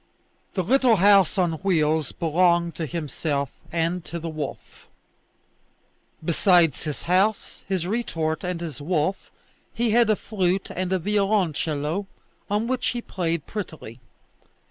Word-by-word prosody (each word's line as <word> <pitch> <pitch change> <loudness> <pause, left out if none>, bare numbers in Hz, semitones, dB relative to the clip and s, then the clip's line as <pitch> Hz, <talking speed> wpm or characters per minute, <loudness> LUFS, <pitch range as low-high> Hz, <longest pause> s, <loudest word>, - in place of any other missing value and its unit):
The 185 - +1
little 255 +3 +4
house 200 -2 +5
on 175 -3 +2
wheels 160 -6 +1
belonged 170 +1 +2
to 160 - -4
himself 145 -3 -2 0.2
and 170 +1 -1
to 170 - -5
the 165 0 -5
wolf. 150 -3 -7 1.4
Besides 170 -2 +4
his 150 -2 -4
house, 195 +4 +1
his 190 -3 -1
retort, 165 -7 -2
and 180 -2 -3
his 155 -5 -6
wolf, 170 +4 -1 0.5
he 235 -1 +1
had 235 0 +4
a 215 - +4
flute 190 -3 -1
and 185 0 -2
a 190 - +3
violoncello 185 -4 0 0.4
on 210 +2 +1
which 255 +1 -1
he 240 - -1
played 170 -4 -2
prettily. 160 - -7
175 Hz, 130 wpm, -24 LUFS, 160-200 Hz, 1.4 s, house